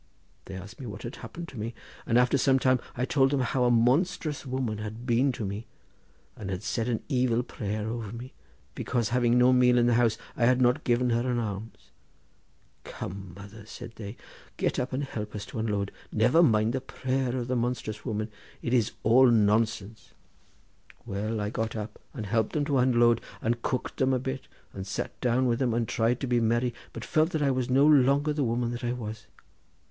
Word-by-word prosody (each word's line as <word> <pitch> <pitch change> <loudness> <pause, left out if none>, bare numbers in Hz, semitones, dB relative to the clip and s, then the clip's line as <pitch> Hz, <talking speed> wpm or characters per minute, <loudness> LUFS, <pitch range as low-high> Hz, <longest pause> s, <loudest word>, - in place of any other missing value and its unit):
They 95 - -8
asked 95 +8 -9
me 130 - -6
what 105 -1 -7
had 120 - -6
happened 170 0 -8
to 125 - -9
me, 115 +2 -4 0.3
and 115 - +3
after 125 +2 +4
some 135 0 +4
time 130 -1 +3 0.2
I 125 - +1
told 135 0 +3
them 140 -1 +1
how 125 +1 +1
a - - +4
monstrous 140 +5 +1
woman 125 -5 -2
had 110 +3 -6
been 125 +3 +3
to 110 - -4
me, 100 +4 -5 0.7
and 100 - -7
had 95 +1 -4
said 115 +1 -1
an 115 - -1
evil 125 -3 +1
prayer 105 -2 -4
over 115 -2 -4
me, 120 +3 -8 0.4
because 120 -4 -1
having 120 0 +3
no 125 +1 +6
meal 125 -1 +5
in 120 - +4
the 120 - +3
house 115 -2 +3 0.2
I 120 - +2
had 125 +1 +4
not 125 +4 +3
given 125 0 +2
her 120 +2 +1
an 120 - 0
alms. 110 -1 -5 0.9
'Come, 95 -1 -7
mother,' 100 +2 -11
said 115 0 -9
they, 105 +1 -7 0.4
'get - - 0
up 125 0 -2
and 135 +3 -1
help 105 -6 -5
us 105 -1 -5
to - - -6
unload! 105 -3 -1 0.2
never 125 +10 +4
mind 110 -7 +3
the 130 - -1
prayer 130 -1 -2
of 120 -1 -3
the 130 - 0
monstrous 120 -3 -2
woman—it 110 +1 -5
is 115 -4 +2
all 125 +4 +6
nonsense.' 110 -1 +1 0.9
Well, 105 +3 -2
I 105 0 -2
got 110 0 -2
up 105 0 -6
and 115 -7 -6
helped 110 +1 0
them 150 -2 0
to 140 -2 +1
unload, 120 -2 +4 0.2
and 120 +1 -1
cooked 125 - -2
them 130 0 +2
a - - +2
bit 130 +1 -5 0.3
and 95 0 -6
sat - - -4
down 125 +1 +2
with 120 -1 +1
them, 125 -4 +1
and 115 -1 0
tried 115 +2 +1
to 135 - -1
be 120 -1 +2
merry, 120 +2 +1 0.2
but - - -7
felt 155 +1 +2
that 155 -2 +1
I 140 - +3
was 130 -1 -1
no 135 +3 +5
longer 145 0 +4
the 145 -1 0
woman 120 0 0
that 120 +1 -5
I 120 0 0
was. 110 -3 -7
120 Hz, 205 wpm, -28 LUFS, 110-130 Hz, 0.9 s, no